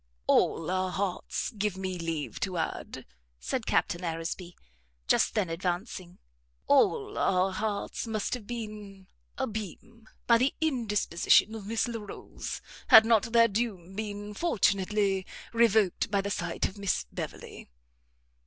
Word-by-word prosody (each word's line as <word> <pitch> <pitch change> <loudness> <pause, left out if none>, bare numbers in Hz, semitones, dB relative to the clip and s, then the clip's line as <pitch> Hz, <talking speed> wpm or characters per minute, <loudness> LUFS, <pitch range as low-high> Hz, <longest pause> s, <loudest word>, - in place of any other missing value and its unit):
"All 165 +2 +2
our 185 0 0
hearts, 190 +4 -2
give 210 -4 -2
me 185 -1 -4
leave 165 -3 -3
to 185 -3 -2
add," 165 - -4 0.3
said - - -3
Captain 175 +1 +1
Aresby 170 +1 -4 0.5
just - - +3
then 210 -4 +1
advancing, 175 +1 -4 0.5
"all - - +3
our 185 0 +2
hearts 205 +3 -3
must 215 -2 -2
have 235 -5 -5
been 210 -4 -7 0.3
abimés, 220 +2 -6 0.2
by 235 -1 +5
the 260 +3 +1
indisposition 220 - +2
of 215 -3 -7
Miss 225 +2 0
Larolles, 225 -4 -6 0.3
had 220 - +10
not 225 0 +3
their 230 0 +6
doom 200 -5 -3
been 205 0 -5
fortunately 200 - +1 0.3
revoked 220 -5 +3
by 200 -1 +1
the 200 +1 -2
sight - - -1
of 200 - -11
Miss 200 -1 0
Beverley." - - -7
205 Hz, 130 wpm, -29 LUFS, 185-220 Hz, 0.5 s, had